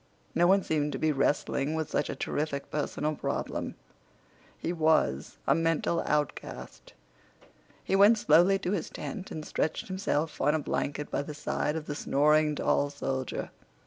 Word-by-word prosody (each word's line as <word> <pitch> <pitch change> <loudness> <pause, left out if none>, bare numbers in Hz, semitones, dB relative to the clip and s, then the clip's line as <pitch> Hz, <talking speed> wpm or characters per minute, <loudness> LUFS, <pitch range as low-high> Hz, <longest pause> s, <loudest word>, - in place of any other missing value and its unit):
No 175 +1 +4
one 195 +1 +4
seemed 150 -2 0
to - - -2
be 155 - +2
wrestling 140 +1 0
with 160 -2 -3
such 145 - 0
a - - -3
terrific 145 -2 -3
personal 150 0 -1
problem. - - -3 0.8
He 170 - -3
was 155 - +1
a - - +4
mental 165 +1 +1
outcast. 150 -2 -3 0.9
He 190 - 0
went 205 +4 +7
slowly 180 +1 +5
to 190 -2 -3
his 190 -6 -2
tent 195 -3 -6
and 155 -1 -6
stretched 160 - -2
himself 165 -5 -1
on 150 +3 +3
a - - +1
blanket 145 0 -3
by - - 0
the 150 +1 -7
side 150 0 -1
of 160 -2 -4
the 145 - -4
snoring 150 +1 +3
tall 145 0 +1
soldier. 135 -2 -3
155 Hz, 160 wpm, -29 LUFS, 145-165 Hz, 0.9 s, went